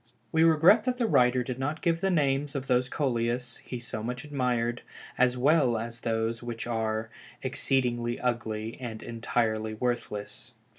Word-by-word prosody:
We 160 - +3
regret 165 +7 +6
that 250 -1 0
the 245 - +1
writer 125 - +4
did 125 0 -5
not 145 +4 -2
give 165 -2 +1
the 195 - +2
names 145 -4 +1
of 135 -1 -2
those 125 -1 +2
Coleus 120 -3 -1
he 125 - -7
so 120 -2 -5
much 125 +2 -4
admired 125 -4 -1 0.3
as 125 0 +3
well 135 -3 +4
as 115 +1 -5
those 115 0 -1
which 120 -2 -5
are 110 -1 -2 0.3
"exceedingly 125 -2 0
ugly" 115 -2 -2
and 115 -3 -6
"entirely 110 -2 -1
worthless." 110 -1 -3
125 Hz, 155 wpm, -28 LUFS, 115-135 Hz, 0.3 s, regret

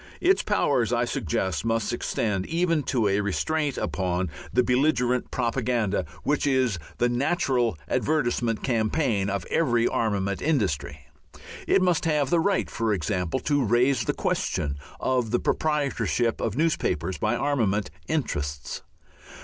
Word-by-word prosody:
Its 375 +2 +3
powers, 135 - +1
I 120 0 +2
suggest, 95 -3 -2
must 115 0 0
extend 105 -5 -1
even 165 -1 +1
to 115 -5 +1
a 100 +1 +2
restraint 145 +8 -1
upon 90 -2 -1 0.2
the 125 - +3
belligerent 125 -1 +1
propaganda 115 -7 0 0.2
which 150 0 +1
is 130 -8 +2 0.2
the 120 - +2
natural 125 - +1
advertisement 120 -7 0
campaign 110 -3 +1
of 100 -3 -2
every 120 -7 +2
armament 100 -3 -1
industry. 75 - -1 0.7
It 195 - +4
must 180 -4 +2
have 150 -4 +1
the 170 - +4
right, 200 +4 +1
for 115 -1 -1
example, 90 -1 -1
to 145 -2 +1
raise 120 +1 +2
the - - 0
question 70 0 -1 0.2
of 125 -3 0
the 120 - +1
proprietorship 140 -6 0
of 115 +1 -2
newspapers 95 - 0
by 110 +3 +1
armament 110 -9 0 0.2
interests. 75 - -3
120 Hz, 135 wpm, -26 LUFS, 100-145 Hz, 0.7 s, It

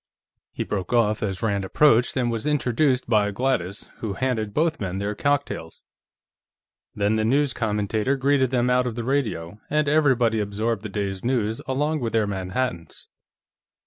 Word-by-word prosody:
He - - -3
broke 95 +1 -3
off 110 -3 +2
as 95 -2 -3
Rand 100 -3 0
approached 125 +4 +3
and 120 -2 +1
was 115 +4 -2
introduced 130 -2 +1
by 105 -3 +3
Gladys, 105 -4 -1
who 110 -3 -4
handed 110 -2 -1
both 160 +7 0
men 95 -2 -3
their 100 +1 -2
cocktails. 140 - -2 1.1
Then 105 +2 +1
the 110 - +1
news 135 +4 +2
commentator 110 +3 0
greeted 135 -1 +2
them 125 -1 +1
out 125 0 +2
of 120 - -4
the 120 - -3
radio, 110 -9 -2
and 150 0 +1
everybody 130 -7 +3
absorbed 105 +1 -1
the 105 - -6
day's 100 -2 -3
news 115 -3 0
along 150 +4 0
with 115 -4 -3
their 110 -2 +3
Manhattans. 95 -1 -4
115 Hz, 160 wpm, -24 LUFS, 105-130 Hz, 1.1 s, approached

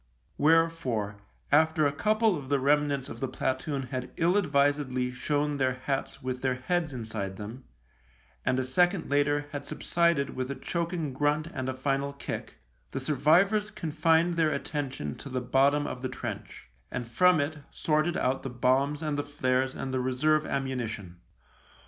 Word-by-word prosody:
Wherefore, 150 -10 +2 0.3
after 160 +1 +4
a 145 - +3
couple 215 +6 +2
of 140 -4 -7
the 140 -1 +2
remnants 145 -1 +2
of - - -8
the 135 - -1
platoon 135 +2 -2
had 125 -1 -3
ill 170 +3 +3
advisedly 140 -7 +2
shown 145 +3 -1
their 130 -2 +1
hats 135 -2 -2
with 130 0 -3
their 130 -1 +1
heads 160 +5 -1
inside 110 -6 -4
them, 110 +5 -8 0.8
and 130 - +1
a 130 - +1
second 175 +6 +1
later 145 0 +2
had 140 0 -6
subsided 170 -5 +1
with 130 0 -3
a 140 - -3
choking 170 -4 -2
grunt 150 +3 +1
and 130 -1 -3
a 130 - -3
final 140 +1 -1
kick, 140 - -6 0.3
the - - -4
survivors 165 +10 +3
confined 165 -1 +1
their 160 -2 +4
attention 140 - -3
to 140 - -8
the 130 -1 -1
bottom 135 +4 +3
of 125 - -5
the 130 - -2
trench, 125 - -7 0.2
and 125 -2 -4
from 180 +8 +4
it 150 +2 -2
sorted 155 +2 0
out 130 +1 0
the 135 - -5
bombs 135 +5 +1
and 150 -2 -1
the - - 0
flares 130 -2 0
and 130 -1 -4
the 130 - +1
reserve 150 +5 +2
ammunition. 120 -9 -3
140 Hz, 165 wpm, -28 LUFS, 130-155 Hz, 0.8 s, after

